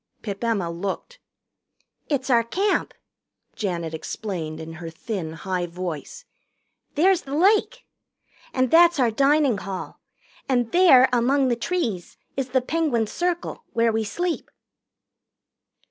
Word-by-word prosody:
Pip 200 0 -5
Emma 205 -7 0
looked. 195 - -5 0.9
"It's 275 -3 0
our 235 -1 +5
Camp," 390 - 0 0.6
Janet 170 -6 -3
explained 160 -2 -5
in 160 0 -7
her 165 - -5
thin 165 -1 -5
high 180 +1 -3
voice. 175 - -6 0.7
"There's 365 +4 +4
the 275 +1 -5
lake. 425 +8 +2 0.7
And 255 -1 0
that's 340 -1 +6
our 240 -3 +3
dining 275 -2 +3
hall. 195 -2 -6 0.5
And 245 -3 +1
there, 335 -8 +7
among 260 +3 +3
the 240 - +2
trees, 235 - -3 0.2
is 270 -1 -2
the 260 0 +2
Penguin 275 -5 0
Circle, 350 - -3
where 230 0 +3
we 220 0 0
sleep." 345 +10 -3
240 Hz, 125 wpm, -24 LUFS, 190-320 Hz, 0.9 s, there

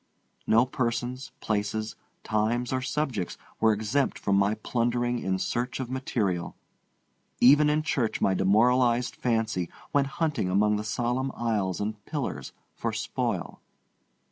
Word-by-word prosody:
No 115 +3 +5
persons, 125 +1 -2
places, 110 +1 -2 0.3
times, 115 +4 0
or 130 - 0
subjects 130 - -2 0.2
were 110 0 +5
exempt 110 +6 0
from 100 - 0
my 100 +2 +3
plundering 120 +2 0
in 95 -3 -1
search 120 +7 -2
of 130 -1 -4
material. 105 -9 -1 0.8
Even 145 +4 +6
in 150 +1 +1
church 125 -7 0
my 95 - +2
demoralized 120 +5 +3
fancy 110 -7 0 0.2
went 140 -1 +3
hunting 150 - 0
among 105 +3 +3
the 105 - -3
solemn 120 +5 -1
aisles 105 -6 -1
and 105 0 -4
pillars - - -4 0.2
for - - -3
spoil. - - -3
115 Hz, 130 wpm, -27 LUFS, 105-125 Hz, 0.8 s, Even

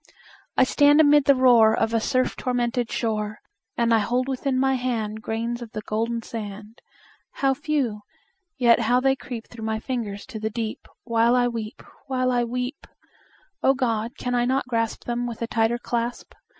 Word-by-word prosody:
I - - +6
stand 290 +3 +4
amid 295 -2 +6
the 280 - +6
roar 235 -4 +5
Of 225 - 0
a 230 - +3
surf 255 +3 0
tormented 245 -1 -1
shore, 215 -2 -2 0.4
And 235 -1 +2
I 225 - +5
hold 245 +4 0
within 265 0 -1
my 265 0 +2
hand 225 -4 -2
Grains 230 +2 -3
of 230 -3 -9
the 215 - -5
golden 230 +2 -2
sand 210 0 -8 0.5
How 270 -1 +1
few! 270 -7 -1 0.6
yet 240 -3 +5
how 240 +2 +3
they 270 +1 +2
creep 240 -4 -7
Through 230 -2 -11
my 220 0 -1
fingers 220 -5 -4
to 240 -4 -8
the 220 0 -2
deep 220 0 -5 0.2
While 230 +1 +3
I 245 -1 +3
weep 230 +1 -5 0.2
while 255 -1 0
I 245 -1 +2
weep! 250 +4 -4 0.7
O 270 - +4
God! 235 -1 -1
can 250 - -3
I 240 -1 +2
not 260 +1 0
grasp 230 -2 -1
Them 240 0 -2
with 235 -1 -5
a - - +1
tighter 230 0 +1
clasp? 240 0 -3
240 Hz, 180 wpm, -24 LUFS, 225-255 Hz, 0.7 s, I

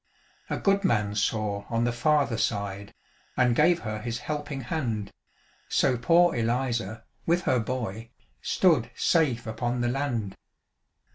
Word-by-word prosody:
A - - -1
good 200 0 +2
man 105 - +1
saw 105 -1 -1
on 115 0 0
the 120 - +1
farther 135 -1 +1
side, 100 0 -2 0.4
And 125 -2 +3
gave 170 +4 +4
her 110 -1 -4
his 115 0 -3
helping 145 0 -4
hand; 115 -7 -3 0.6
So 130 - +2
poor 170 +7 +4
Eliza, 115 -2 -1 0.2
with 175 +2 +2
her 130 - +2
boy, 115 -2 -4 0.3
Stood - - +2
safe 135 -8 +2
upon 120 +2 -2
the 120 - +1
land. 120 -7 -2
120 Hz, 135 wpm, -27 LUFS, 110-145 Hz, 0.6 s, gave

